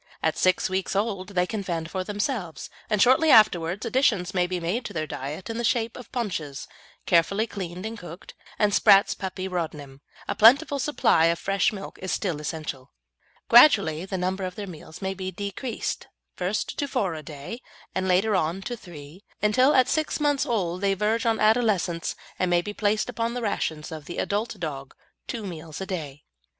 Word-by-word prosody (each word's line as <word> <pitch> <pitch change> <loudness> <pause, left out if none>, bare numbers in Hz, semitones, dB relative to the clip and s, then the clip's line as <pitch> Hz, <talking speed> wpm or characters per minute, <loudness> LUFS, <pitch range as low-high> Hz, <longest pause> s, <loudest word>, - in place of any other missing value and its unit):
At 160 -1 +2
six 185 0 +2
weeks 190 +1 -2
old 195 -3 -1
they 180 0 +3
can 215 +2 -4
fend 165 -3 -4
for 185 -1 -2
themselves, 205 - -3 0.2
and 210 - +1
shortly 260 +8 +5
afterwards 200 - +4
additions 225 -7 +1
may 180 -1 +2
be 180 0 -2
made 180 +9 -2
to 205 - -6
their 155 -3 -2
diet 150 +5 -6
in 225 0 -4
the - - -2
shape 230 -1 +1
of 250 - -11
paunches, 165 - -4 0.4
carefully 190 +5 +3
cleaned 185 -3 -6
and 225 0 -5
cooked, 175 0 -10 0.2
and 210 -1 +2
Spratt's 195 0 +6
Puppy 185 0 -5
Rodnim. 150 -6 -5 0.3
A - - 0
plentiful 280 +6 +5
supply 250 - +3
of 170 0 +2
fresh 195 +1 +1
milk 195 -2 -8
is 185 - -3
still 175 -7 -2
essential. 150 -4 -5 0.6
Gradually 200 - +6
the 190 0 -4
number 185 +2 -2
of 185 -1 -4
their 205 - -5
meals 160 -1 -10
may 190 0 -1
be 190 -1 -5
decreased, 205 +6 -4 0.3
first 185 +3 -2
to 285 - 0
four 195 -9 -1
a 155 - -6
day, 150 - -8 0.3
and 190 0 -1
later 195 +4 +3
on 180 +2 0
to 240 - -4
three, 170 -2 -12 0.2
until 255 +7 +4
at 255 -1 +5
six 310 +3 0
months 290 -2 +1
old 185 -6 -1
they 195 -1 +2
verge 220 +4 0
on 225 -1 +2
adolescence; 215 -6 +2 0.2
and 185 - +1
may 175 0 +3
be 210 - -5
placed 210 0 0
upon 235 -1 -2
the 245 - -3
rations 160 -7 -2
of 155 -2 -7
the 175 - -7
adult 210 +1 -2
dog, 140 -5 -5 0.3
two 230 -4 -4
meals 160 -4 -7
a 190 - -4
day. 150 -7 -6
190 Hz, 190 wpm, -25 LUFS, 170-220 Hz, 0.6 s, Spratt's